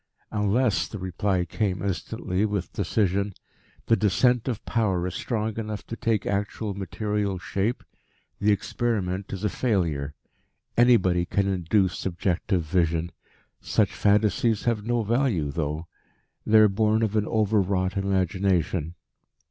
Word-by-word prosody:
"Unless," 105 Hz, +2 st, +1 dB
the 105 Hz, -, -7 dB
reply 95 Hz, 0 st, -1 dB
came 95 Hz, +2 st, -2 dB
instantly 95 Hz, 0 st, -2 dB
with 100 Hz, -4 st, -2 dB
decision, 100 Hz, 0 st, 0 dB, 0.5 s
"the 115 Hz, -, +4 dB
descent 115 Hz, +4 st, +2 dB
of 120 Hz, -5 st, -3 dB
Power 95 Hz, -7 st, 0 dB
is 90 Hz, -, -3 dB
strong 110 Hz, -2 st, -2 dB
enough 105 Hz, -1 st, -5 dB
to 115 Hz, -, -6 dB
take 110 Hz, -3 st, 0 dB
actual 100 Hz, +1 st, -2 dB
material 100 Hz, 0 st, -2 dB
shape, 100 Hz, +6 st, -2 dB, 0.6 s
the 105 Hz, +1 st, +3 dB
experiment 100 Hz, -2 st, -1 dB
is 95 Hz, 0 st, -5 dB
a -, -, +3 dB
failure. 80 Hz, -, -1 dB, 0.6 s
Anybody 95 Hz, -8 st, +4 dB
can 100 Hz, 0 st, +1 dB
induce 95 Hz, 0 st, +1 dB
subjective 90 Hz, 0 st, -1 dB
vision. 85 Hz, 0 st, 0 dB, 0.5 s
Such -, -, +1 dB
fantasies 105 Hz, +1 st, +2 dB
have 115 Hz, -3 st, 0 dB
no 120 Hz, +1 st, 0 dB
value 110 Hz, -, +1 dB
though. 75 Hz, +2 st, -3 dB, 0.6 s
They 110 Hz, -, +6 dB
are 110 Hz, 0 st, +8 dB
born 110 Hz, +2 st, +2 dB
of 110 Hz, -1 st, -1 dB
an 105 Hz, -1 st, +1 dB
overwrought 100 Hz, -3 st, +1 dB
imagination." 95 Hz, -3 st, 0 dB
100 Hz, 130 wpm, -25 LUFS, 90-110 Hz, 0.6 s, are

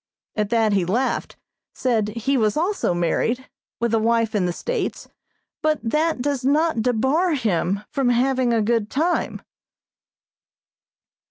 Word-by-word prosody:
At 210 Hz, -2 st, -1 dB
that 225 Hz, -2 st, +2 dB
he 195 Hz, -2 st, +2 dB
laughed, 230 Hz, +10 st, -1 dB, 0.4 s
said 230 Hz, -5 st, +1 dB
he 230 Hz, +6 st, -1 dB
was 215 Hz, -2 st, +1 dB
also 345 Hz, -, 0 dB
married, 230 Hz, +9 st, 0 dB, 0.3 s
with 235 Hz, -1 st, 0 dB
a 225 Hz, -, +4 dB
wife 230 Hz, 0 st, +1 dB
in 195 Hz, -4 st, +1 dB
the -, -, 0 dB
States, 485 Hz, -, -3 dB, 0.5 s
but 310 Hz, -1 st, +1 dB
that 300 Hz, +3 st, 0 dB
does 280 Hz, -2 st, -1 dB
not 295 Hz, -1 st, +2 dB
debar 265 Hz, +9 st, +1 dB
him 200 Hz, -, 0 dB
from 270 Hz, -3 st, +1 dB
having 255 Hz, 0 st, +2 dB
a 225 Hz, -2 st, +2 dB
good 225 Hz, -1 st, 0 dB
time. 335 Hz, +5 st, -1 dB
235 Hz, 140 wpm, -22 LUFS, 215-275 Hz, 0.5 s, a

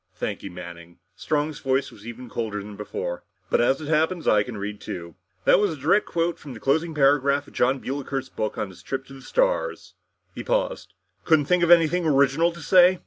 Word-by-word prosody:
"Thank 100 Hz, +3 st, -4 dB
you, 100 Hz, -, -7 dB
Manning." 85 Hz, -1 st, -10 dB, 0.2 s
Strong's 150 Hz, -1 st, -2 dB
voice 135 Hz, +1 st, 0 dB
was 105 Hz, +1 st, -14 dB
even 120 Hz, +2 st, -8 dB
colder 110 Hz, -3 st, -3 dB
than 105 Hz, +1 st, -9 dB
before. 95 Hz, -4 st, -5 dB, 0.3 s
"But -, -, +4 dB
as 130 Hz, +3 st, +2 dB
it 155 Hz, -, -7 dB
happens, 160 Hz, +3 st, +1 dB
I 105 Hz, -, +5 dB
can 110 Hz, +1 st, -5 dB
read 100 Hz, +1 st, -5 dB
too. 85 Hz, -1 st, -7 dB, 0.3 s
That -, -, +6 dB
was 205 Hz, -4 st, +1 dB
a -, -, -6 dB
direct 165 Hz, +10 st, +2 dB
quote 170 Hz, 0 st, -1 dB
from 135 Hz, -4 st, -9 dB
the -, -, -9 dB
closing 160 Hz, +6 st, 0 dB
paragraph 140 Hz, 0 st, +3 dB
of -, -, -16 dB
Jon 130 Hz, +2 st, +2 dB
Builker's 135 Hz, 0 st, -4 dB
book 110 Hz, -, -3 dB
on 105 Hz, -, -2 dB
his 95 Hz, -, -14 dB
trip 135 Hz, 0 st, -4 dB
to 135 Hz, -, -13 dB
the 135 Hz, -, -11 dB
stars!" -, -, -1 dB, 0.4 s
He -, -, -6 dB
paused. -, -, -2 dB, 0.3 s
"Couldn't 160 Hz, -3 st, +4 dB
you -, -, -17 dB
think 180 Hz, -1 st, +4 dB
of 170 Hz, -, +2 dB
anything 170 Hz, 0 st, +5 dB
original 140 Hz, +3 st, +3 dB
to 170 Hz, 0 st, -11 dB
say?" 180 Hz, +2 st, +5 dB
140 Hz, 215 wpm, -24 LUFS, 110-165 Hz, 0.4 s, That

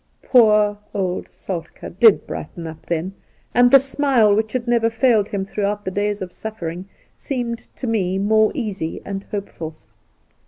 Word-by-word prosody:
Poor 210 Hz, -4 st, +4 dB, 0.2 s
old 185 Hz, -2 st, -2 dB
Soltk^ 170 Hz, 0 st, -7 dB
did 225 Hz, -3 st, +6 dB
brighten 170 Hz, -, -7 dB
up 160 Hz, 0 st, -9 dB
then, 170 Hz, +3 st, -2 dB, 0.4 s
and 245 Hz, 0 st, +6 dB
the 275 Hz, -, +9 dB
smile 270 Hz, -5 st, +3 dB
which 215 Hz, +1 st, 0 dB
had 250 Hz, -2 st, -2 dB
never 235 Hz, -1 st, +3 dB
failed 225 Hz, -3 st, +2 dB
him 195 Hz, -2 st, -2 dB
throughout 205 Hz, +1 st, -2 dB
the 185 Hz, -, -2 dB
days 205 Hz, 0 st, -1 dB
of 180 Hz, -, -8 dB
sufiering 180 Hz, -4 st, -6 dB, 0.3 s
seemed 240 Hz, -4 st, -4 dB
to -, -, -6 dB
me 195 Hz, -5 st, 0 dB
more 215 Hz, +2 st, +3 dB
easy 200 Hz, -, -3 dB
and 195 Hz, 0 st, -5 dB
hopeful. 170 Hz, -6 st, -6 dB
210 Hz, 155 wpm, -21 LUFS, 190-230 Hz, 0.4 s, the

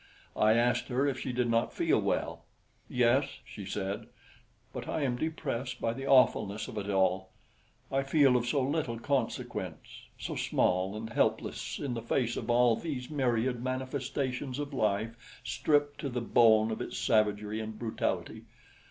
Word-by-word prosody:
I 110 Hz, 0 st, +4 dB
asked 120 Hz, +1 st, +2 dB
her 130 Hz, +2 st, +1 dB
if 135 Hz, -3 st, -1 dB
she 130 Hz, -, -3 dB
did 125 Hz, 0 st, 0 dB
not 115 Hz, 0 st, +1 dB
feel -, -, +2 dB
well. -, -, -1 dB, 0.5 s
"Yes," 125 Hz, +3 st, +3 dB, 0.2 s
she 100 Hz, -3 st, -9 dB
said, 100 Hz, +3 st, -3 dB, 0.7 s
"but -, -, -6 dB
I 155 Hz, -, -1 dB
am 125 Hz, -3 st, +1 dB
depressed 130 Hz, -4 st, -3 dB
by 115 Hz, -, 0 dB
the 135 Hz, +3 st, -6 dB
awfulness 110 Hz, -6 st, +4 dB
of 110 Hz, -, -5 dB
it 100 Hz, 0 st, -5 dB
all. 95 Hz, -1 st, +1 dB, 0.6 s
I 135 Hz, -, +2 dB
feel 135 Hz, -1 st, +4 dB
of 120 Hz, -1 st, +1 dB
so 140 Hz, +1 st, +1 dB
little 135 Hz, -4 st, -1 dB
consequence 135 Hz, +3 st, -3 dB
so -, -, -5 dB
small 95 Hz, +3 st, +1 dB
and 110 Hz, +1 st, -6 dB
helpless -, -, 0 dB
in 140 Hz, -4 st, -3 dB
the 115 Hz, -, -3 dB
face 120 Hz, +1 st, 0 dB
of 115 Hz, -, -5 dB
all 120 Hz, -1 st, +5 dB
these 135 Hz, -2 st, -5 dB
myriad 125 Hz, -3 st, 0 dB
manifestations 130 Hz, 0 st, -2 dB
of 145 Hz, 0 st, -4 dB
life 115 Hz, +1 st, -2 dB
stripped 145 Hz, +6 st, +1 dB
to 140 Hz, -, -3 dB
the 125 Hz, -1 st, -2 dB
bone 110 Hz, -2 st, +4 dB
of 110 Hz, -, -3 dB
its -, -, -5 dB
savagery 105 Hz, -1 st, +1 dB
and 110 Hz, 0 st, -5 dB
brutality. 115 Hz, -1 st, -3 dB
120 Hz, 160 wpm, -30 LUFS, 110-135 Hz, 0.7 s, all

